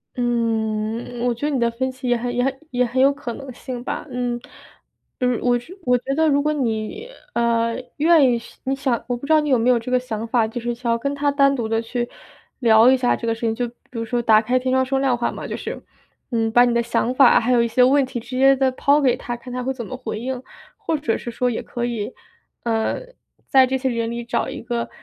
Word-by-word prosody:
嗯， 230 Hz, -1 st, -1 dB
我 245 Hz, -, +2 dB
觉 240 Hz, +6 st, -3 dB
得 -, -, 0 dB
你 270 Hz, -, 0 dB
的 235 Hz, 0 st, +2 dB
分 260 Hz, +3 st, -2 dB
析 260 Hz, 0 st, -7 dB
也 245 Hz, -, +3 dB
很 245 Hz, +1 st, -2 dB
也 245 Hz, -, +1 dB
很 270 Hz, 0 st, -1 dB
也 250 Hz, -3 st, +1 dB
很 250 Hz, +2 st, 0 dB
有 275 Hz, +1 st, +6 dB
可 265 Hz, -4 st, -6 dB
能 275 Hz, +2 st, -8 dB
性 245 Hz, 0 st, -7 dB
吧， -, -, -4 dB
嗯。 245 Hz, -1 st, -2 dB, 0.8 s
嗯， 250 Hz, -2 st, +1 dB
我 245 Hz, -1 st, +3 dB
觉 245 Hz, +9 st, -10 dB
我 250 Hz, 0 st, +4 dB
觉 270 Hz, +3 st, -3 dB
得 320 Hz, +1 st, +3 dB
如 285 Hz, -1 st, +3 dB
果 300 Hz, -, +1 dB
你， 255 Hz, -, -2 dB, 0.3 s
呃， 230 Hz, 0 st, +1 dB, 0.2 s
愿 310 Hz, -3 st, +5 dB
意 240 Hz, -, +2 dB, 0.3 s
你 270 Hz, +1 st, 0 dB
想 265 Hz, -4 st, -1 dB
我 245 Hz, -, -1 dB
不 240 Hz, -, -8 dB
知 305 Hz, -, -2 dB
道 310 Hz, -, +6 dB
你 300 Hz, -, -1 dB
有 260 Hz, -, +4 dB
没 235 Hz, +2 st, +2 dB
有 245 Hz, -2 st, +4 dB
这 230 Hz, -, -7 dB
个 255 Hz, -, +3 dB
想 230 Hz, -3 st, -4 dB
法， 230 Hz, -1 st, +2 dB
就 225 Hz, +2 st, -5 dB
是 240 Hz, 0 st, -3 dB
想 235 Hz, 0 st, -2 dB
要 230 Hz, -, +2 dB
跟 280 Hz, +4 st, -2 dB
她 285 Hz, 0 st, +1 dB
单 275 Hz, -1 st, +3 dB
独 240 Hz, -4 st, -2 dB
地 225 Hz, 0 st, +1 dB
去 240 Hz, +1 st, -3 dB, 0.5 s
聊 230 Hz, 0 st, +6 dB
一 265 Hz, -, +4 dB
下 245 Hz, -1 st, +2 dB
这 -, -, -6 dB
个 230 Hz, -, +1 dB
事 225 Hz, -, -9 dB
情， 225 Hz, -1 st, 0 dB
就 245 Hz, +1 st, -1 dB
比 -, -, -22 dB, 0.2 s
如 230 Hz, -2 st, -4 dB
说 240 Hz, +1 st, -1 dB
打 220 Hz, -2 st, +5 dB
开 250 Hz, +3 st, +1 dB
天 255 Hz, +1 st, -2 dB
窗 260 Hz, 0 st, +3 dB
说 270 Hz, +1 st, 0 dB
亮 265 Hz, -3 st, +2 dB
话 240 Hz, -, -1 dB
嘛， -, -, -7 dB
就 -, -, -4 dB
是， -, -, -6 dB, 0.5 s
嗯， 225 Hz, -1 st, 0 dB
把 245 Hz, +2 st, +6 dB
你 240 Hz, -, +1 dB
的 235 Hz, 0 st, +2 dB
想 235 Hz, +1 st, 0 dB
法 270 Hz, -, +6 dB
还 245 Hz, +2 st, +1 dB
有 235 Hz, -1 st, +4 dB
一 -, -, +1 dB
些 235 Hz, +3 st, +2 dB
问 275 Hz, +1 st, +4 dB
题 255 Hz, -1 st, -5 dB
直 250 Hz, +2 st, -7 dB
接 270 Hz, +1 st, +6 dB
地 265 Hz, 0 st, +3 dB
抛 285 Hz, +3 st, +3 dB
给 265 Hz, -4 st, +3 dB
她， 240 Hz, -1 st, -5 dB
看 245 Hz, +1 st, -10 dB
她 250 Hz, 0 st, -3 dB
会 265 Hz, +2 st, -1 dB
怎 240 Hz, -3 st, -6 dB
么 255 Hz, -, -6 dB
回 225 Hz, -4 st, -5 dB
应。 255 Hz, +1 st, -4 dB, 0.3 s
或 410 Hz, -8 st, -1 dB
者 280 Hz, -6 st, -1 dB
是 240 Hz, -, -6 dB
说 245 Hz, +2 st, 0 dB
也 235 Hz, -, -3 dB
可 240 Hz, -1 st, -4 dB
以， 235 Hz, -1 st, -3 dB, 0.5 s
呃， 225 Hz, -1 st, 0 dB, 0.5 s
在 265 Hz, -1 st, +6 dB
这 265 Hz, +1 st, -1 dB
些 265 Hz, +1 st, -2 dB
人 230 Hz, -1 st, -2 dB
里 235 Hz, 0 st, -5 dB
找 235 Hz, 0 st, -1 dB
一 -, -, -6 dB
个， 235 Hz, 0 st, -3 dB
245 Hz, 285 characters per minute, -21 LUFS, 235-265 Hz, 0.8 s, 有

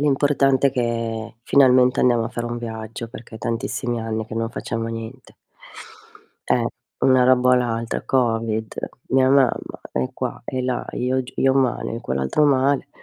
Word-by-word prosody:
L'importante 140 Hz, -1 st, +3 dB
è -, -, +2 dB
che 115 Hz, -3 st, -3 dB
finalmente 125 Hz, -2 st, +5 dB
andiamo 120 Hz, -2 st, +3 dB
a 115 Hz, -, -3 dB
fare 120 Hz, -1 st, -5 dB
un 120 Hz, 0 st, -3 dB
viaggio, 115 Hz, 0 st, -6 dB
perché 115 Hz, -1 st, -11 dB
è -, -, -11 dB
tantissimi 115 Hz, +1 st, -2 dB
anni 110 Hz, -1 st, -3 dB
che 110 Hz, -, -8 dB
non 115 Hz, 0 st, -2 dB
facciamo 115 Hz, -1 st, -4 dB
niente. 115 Hz, +3 st, -8 dB, 1.2 s
Eh, -, -, +3 dB, 0.4 s
una 130 Hz, -1 st, +5 dB
roba 125 Hz, 0 st, +4 dB
o -, -, +6 dB
l'altra, 115 Hz, -2 st, -1 dB
Covid, 115 Hz, -3 st, 0 dB, 0.3 s
mia 130 Hz, 0 st, +3 dB
mamma 135 Hz, -3 st, +2 dB
è 65 Hz, 0 st, -2 dB
qua -, -, -5 dB
e 130 Hz, +1 st, -3 dB
là, 125 Hz, -1 st, -2 dB
io 130 Hz, +1 st, 0 dB
g 125 Hz, -, -12 dB
io 135 Hz, -, +3 dB
male, 130 Hz, -4 st, 0 dB
e 115 Hz, -, -5 dB
quell'altro 65 Hz, -, 0 dB
male. 140 Hz, 0 st, +2 dB
120 Hz, 165 wpm, -22 LUFS, 115-130 Hz, 1.2 s, o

